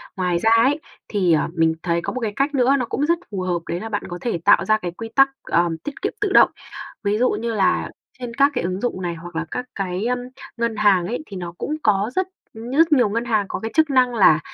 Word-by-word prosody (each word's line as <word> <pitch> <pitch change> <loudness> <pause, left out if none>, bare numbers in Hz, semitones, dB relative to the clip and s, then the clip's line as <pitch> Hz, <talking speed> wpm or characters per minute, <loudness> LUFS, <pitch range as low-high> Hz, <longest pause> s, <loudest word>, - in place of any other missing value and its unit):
Ngoài 180 -3 0
ra 225 - +2
ấy, 255 +6 +4 0.3
thì, 185 -6 +2
ờ, 155 - +2
mình 165 -1 +2
thấy 170 -1 0
có - - -4
một 255 - -3
cái 210 -2 -2
cách 280 +2 0
nữa 260 +1 +4
nó 250 - -1
cũng 280 +5 -1
rất 335 +2 +1
phù 195 - -3
hợp 180 -2 -1
đấy 170 - -2
là 225 - -6
bạn 205 -1 -2
có 175 - -5
thể 230 -8 -2
tạo 205 - +5
ra 215 0 +3
cái 180 -5 -5
quy 225 +6 -8
tắc, 270 0 +6
ờm, 170 -1 +1
tiết 290 - -8
kiệm - - -2
tự 410 -2 0
động. - - +6 0.5
Ví 205 0 +1
dụ 250 +3 +3
như 230 +2 -2
là 195 -3 +1 0.3
trên 240 -2 -6
các 280 +3 +3
cái - - -1
ứng 185 +2 -2
dụng 240 -6 -2
này 175 -2 -3
hoặc 170 +1 -10
là 165 0 -2
các 250 - -3
cái, 190 +1 -3
ưm, 250 +1 0 0.4
ngân 235 -1 -1
hàng 205 -4 +3
ấy, 245 +7 -4
thì 195 - -8
nó 175 -1 -6
cũng 305 - -3
có 210 +2 +2
rất 375 0 +1 0.3
ư, 220 - -10
nhất 300 +7 +2
nhiều 245 -7 +4
ngân 230 +3 -2
hàng 215 -4 +1
có - - -3
cái 225 0 -5
chức 315 -1 +3
năng 255 -3 +3
là 175 -7 +6
215 Hz, 270 wpm, -21 LUFS, 180-250 Hz, 0.5 s, tắc